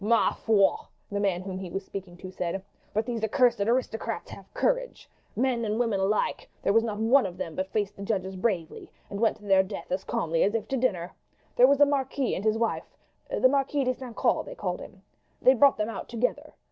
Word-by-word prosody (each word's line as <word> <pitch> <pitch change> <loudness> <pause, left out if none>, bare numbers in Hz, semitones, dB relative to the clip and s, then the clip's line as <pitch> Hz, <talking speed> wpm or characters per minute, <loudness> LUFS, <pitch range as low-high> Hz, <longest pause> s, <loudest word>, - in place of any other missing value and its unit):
"Ma 230 +2 +3
foi!" 205 -4 +3 0.3
the 200 - -1
man 190 -3 0
whom 190 -1 -5
he 190 -2 -6
was 195 +3 -4
speaking 190 -3 -8
to 185 0 -9
said; 185 +1 -3 0.3
"but 215 +1 0
these 235 -2 -3
accursed 240 0 +3
aristocrats 230 +1 -1
have - - -12
courage. - - -1 0.3
Men 250 -2 +1
and 215 +1 -1
women 225 -5 +1
were 190 - +2
alike; 210 +1 -1
there - - +2
was 225 +1 +5
not 215 -3 -3
one 230 +2 +4
of 180 -1 -9
them 165 -3 -4
but 185 +3 -2
faced 205 -2 -1
the - - -9
judges 190 -2 -2
bravely 185 -5 -2 0.2
and 200 - -4
went 225 0 +2
to 210 - -20
their 195 -1 +5
death 190 0 -7
as 185 +1 -1
calmly 170 -9 -1
as 205 +3 +2
if 220 - -2
to 270 - 0
dinner. 185 -9 0 0.4
There 250 - +7
was 280 +1 +3
a 290 - +8
marquis 275 -2 0
and 190 - -3
his 215 0 +2
wife 230 0 -2 0.3
the - - +4
Marquis 275 +1 +1
de 255 0 +1
St. 250 -2 -9
Caux - - +2
they - - -9
called - - -3
him. - - -12 0.4
They 260 - +6
brought 275 +2 +5
them 210 0 0
out - - -6
together. 240 +1 -2
220 Hz, 225 wpm, -27 LUFS, 195-250 Hz, 0.4 s, a